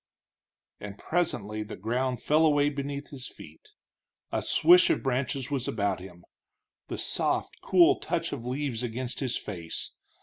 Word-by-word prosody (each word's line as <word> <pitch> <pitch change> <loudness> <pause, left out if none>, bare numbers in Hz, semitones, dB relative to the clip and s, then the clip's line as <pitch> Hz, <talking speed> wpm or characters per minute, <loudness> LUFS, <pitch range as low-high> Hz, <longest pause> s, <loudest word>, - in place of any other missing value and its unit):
And 100 -1 -8
presently 150 - -1
the 105 - -6
ground 125 +5 -1
fell 155 +2 +4
away 145 -2 +4
beneath 140 0 -5
his 130 -3 -7
feet, 430 - -13 0.6
a - - 0
swish 355 +1 +6
of 335 - +1
branches 130 0 -1
was 135 -3 -1
about 100 -3 0
him, 90 -2 -12 0.6
the - - -4
soft, - - -1
cool 175 -3 +5
touch 170 0 -2
of 130 -5 -5
leaves 130 -1 -2
against 125 +1 -4
his 130 -3 -1
face. 85 -3 -4
130 Hz, 145 wpm, -28 LUFS, 110-145 Hz, 0.6 s, swish